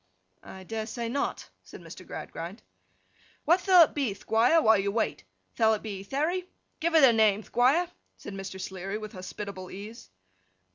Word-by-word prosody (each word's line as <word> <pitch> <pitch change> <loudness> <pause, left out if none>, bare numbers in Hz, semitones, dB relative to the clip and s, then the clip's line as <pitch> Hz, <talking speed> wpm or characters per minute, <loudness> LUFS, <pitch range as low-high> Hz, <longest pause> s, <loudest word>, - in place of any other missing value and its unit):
'I 190 0 -11
dare 220 +3 -4
say 235 0 -4
not,' 280 +4 -2
said - - -13
Mr. - - -11
Gradgrind. - - -7 0.8
'What 345 +3 +4
thall 365 -3 +7
it - - -1
be, 265 -9 -1
Thquire, 230 +10 +3
while 220 -8 +5
you 200 +1 0
wait? 205 - -2 0.3
Thall 220 -1 +4
it 210 - -9
be 200 -3 -5
Therry? 315 - -2 0.3
Give 335 +1 0
it 315 - +7
a 250 -3 +8
name, 215 -2 +3
Thquire!' 270 - +2 0.3
said 205 - -9
Mr. 195 -1 -7
Sleary, 190 +2 -5
with 215 -1 -8
hospitable 185 0 -7
ease. 210 - -10
220 Hz, 170 wpm, -28 LUFS, 195-280 Hz, 0.8 s, a